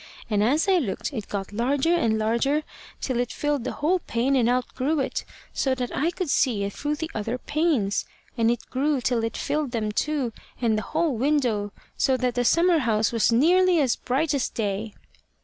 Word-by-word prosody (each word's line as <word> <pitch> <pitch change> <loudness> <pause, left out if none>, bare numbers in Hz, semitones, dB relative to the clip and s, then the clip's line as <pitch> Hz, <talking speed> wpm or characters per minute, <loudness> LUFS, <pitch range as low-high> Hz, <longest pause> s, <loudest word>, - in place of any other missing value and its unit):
And 205 -1 +2
as 285 - +2
I 380 -2 +4
looked 255 - -3
it 220 -6 -5
got 200 0 -4
larger 270 +8 +1
and 230 -11 +2
larger 235 +8 +1 0.4
till 255 -3 -1
it 245 -1 -1
filled 290 -4 -1
the - - -2
whole 350 +5 +1
pane 260 -2 0
and 240 -3 +3
outgrew 255 +4 0
it, 270 - -2 0.3
so 265 -1 +1
that 250 -2 -4
I 310 +5 +1
could 350 -3 -3
see 230 -7 +2
it 200 0 -3
through 295 +1 -2
the 320 +2 -5
other 225 +3 -2
panes; 290 -9 0 0.3
and 230 -2 +2
it 235 -1 -2
grew 280 +2 +1
till 245 -2 0
it 225 0 -2
filled 295 -4 -2
them 215 -2 -1
too 270 0 -1 0.3
and 230 -3 +2
the 215 - 0 0.2
whole 320 -5 +2
window, 240 -6 +1 0.3
so 260 -1 +2
that 250 -1 0
the 245 - 0
summer 335 +6 +4
house 220 -4 +1
was 230 0 +2
nearly 350 +8 +4
as 260 -5 +2
bright 280 +4 -1
as 275 -4 0
day. 210 0 -3
255 Hz, 200 wpm, -25 LUFS, 225-300 Hz, 0.4 s, I